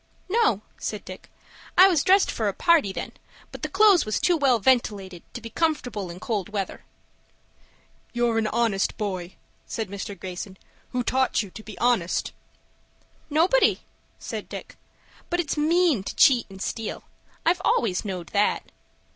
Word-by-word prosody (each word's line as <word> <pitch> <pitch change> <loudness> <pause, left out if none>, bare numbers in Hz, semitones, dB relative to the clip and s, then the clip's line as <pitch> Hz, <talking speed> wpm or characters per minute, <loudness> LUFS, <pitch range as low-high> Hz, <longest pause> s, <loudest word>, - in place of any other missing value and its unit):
"No," 390 - +2 0.2
said 210 -2 -4
Dick. 185 0 -10 0.5
"I 375 - +10
was 335 -7 +2
dressed 385 +1 +4
for 220 - -1
a 200 - -1
party, 325 - +3
then, - - -5 0.4
but - - -9
the - - -3
clo'es 395 -2 +5
was 215 - -1
too 355 - +3
well 275 -6 +3
ventilated 200 -6 +1
to 240 - -5
be 230 0 -9
comfortable 245 - -1
in 170 +1 -8
cold 210 -1 -3
weather." 200 -3 -4 1.3
"You're 240 -2 +1
an 220 - 0
honest 215 -4 0
boy," 185 -4 -4 0.3
said 220 -4 -4
Mr. 200 -1 -6
Greyson. 185 +1 -7 0.3
"Who 250 -1 -1
taught 260 -1 +1
you 195 - -11
to 220 - -10
be 215 -1 -11
honest?" 235 -8 +1 1.0
"Nobody," 340 +12 +3 0.4
said - - -6
Dick. - - -8 0.5
"But 350 - 0
it's 315 -4 -1
mean 315 - +3
to - - -5
cheat 245 -5 +5
and 190 -1 -11
steal. 225 -2 -4 0.4
I've 355 +2 +2
always 200 -7 +1
knowed 185 -5 -5
that." 205 0 0
230 Hz, 155 wpm, -25 LUFS, 195-305 Hz, 1.3 s, I